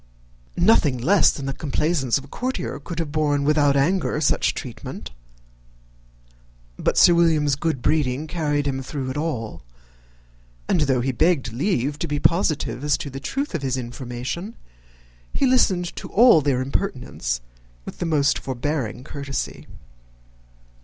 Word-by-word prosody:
Nothing 170 - +4
less 175 +11 +4
than 140 - -4
the 135 - -2
complaisance 145 -2 0
of 135 - -7
a - - -13
courtier 255 - -4
could 165 +3 -7
have 165 -3 -2
borne 145 -2 +1
without 145 -1 +3
anger 160 +2 +1
such 155 - +1
treatment: - - -7 1.6
but - - -1
Sir 175 - +7
William's 160 -4 +3
good 145 -4 -2
breeding 145 -1 +1
carried 150 -3 -1
him 135 -1 -1
through 130 0 -4
it - - -6
all; 115 - -3 1.1
and 165 - +2
though 130 -2 +2
he 135 +2 0
begged 140 -3 +1
leave 145 - -1
to - - -2
be 145 - -1
positive 145 -8 +1
as 150 - +2
to 140 - -6
the 135 - -6
truth 275 - -3
of 170 - -2
his 135 -1 -1
information, 125 - -5 0.8
he - - +1
listened 190 -9 +2
to - - -6
all 230 -6 +6
their 135 -3 +1
impertinence 130 - -3 0.5
with - - -9
the 175 - -1
most 145 -3 +2
forbearing 130 -2 -3
courtesy. 140 -1 -5
145 Hz, 145 wpm, -23 LUFS, 130-165 Hz, 1.6 s, Sir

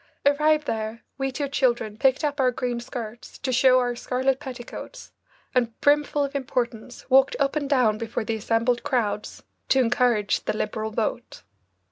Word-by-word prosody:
Arrived 300 +1 +3
there, 220 -1 -3 0.2
we 270 0 -1
two 285 +2 -2
children 240 -6 0
picked 265 +5 +2
up 290 -1 -1
our 260 -1 +4
green 245 -1 -2
skirts 235 -1 -8
to 260 -2 -2
show 255 +1 +5
our 245 -1 +1
scarlet 260 +2 0
petticoats, 265 - -9 0.4
and 235 -3 0
brimful 290 0 +3
of 280 0 -3
importance, 245 -3 -3
walked 265 +1 +5
up 275 +1 +1
and 285 -2 -1
down 240 -7 +3
before 230 0 -3
the 225 - -1
assembled 230 +3 +1
crowds 220 -7 -2 0.3
to 265 - +4
encourage 240 -4 +2
the 215 - -1
Liberal 215 +1 -2
vote. 225 +2 -3
250 Hz, 160 wpm, -25 LUFS, 230-275 Hz, 0.4 s, show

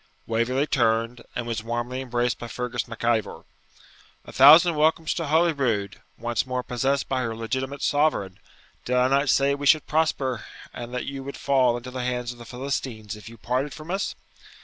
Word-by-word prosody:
Waverley 115 +5 0
turned, 115 -2 +1
and 120 - -2
was 115 -2 -3
warmly 120 +3 -3
embraced 120 -1 -1
by 120 - -6
Fergus 120 0 -3
Mac 115 -1 -9
Ivor. 115 -3 0 0.8
'A - - -10
thousand 160 +6 +8
welcomes 155 +1 +2
to 165 -3 -3
Holyrood, 140 - +1 0.2
once 120 -1 -1
more 125 -1 -3
possessed 135 +3 0
by 130 -1 -1
her 115 -2 -3
legitimate 130 +5 -3
sovereign! 145 -11 +1 0.4
Did 125 - -1
I 125 +1 +3
not 140 +1 +2
say 140 0 +3
we 140 0 -2
should 155 +2 +5
prosper, 140 -7 0 0.3
and 120 0 -7
that 125 0 -3
you 135 -1 -5
would 140 +1 -7
fall 130 -4 +2
into 125 +1 -8
the 125 0 -4
hands 125 -1 -2
of 120 - -13
the 120 - -10
Philistines 120 -3 -4
if 105 +1 -11
you 115 - -13
parted 130 +6 -2
from 155 +2 -8
us?' 195 +1 -2
125 Hz, 185 wpm, -25 LUFS, 120-140 Hz, 0.8 s, thousand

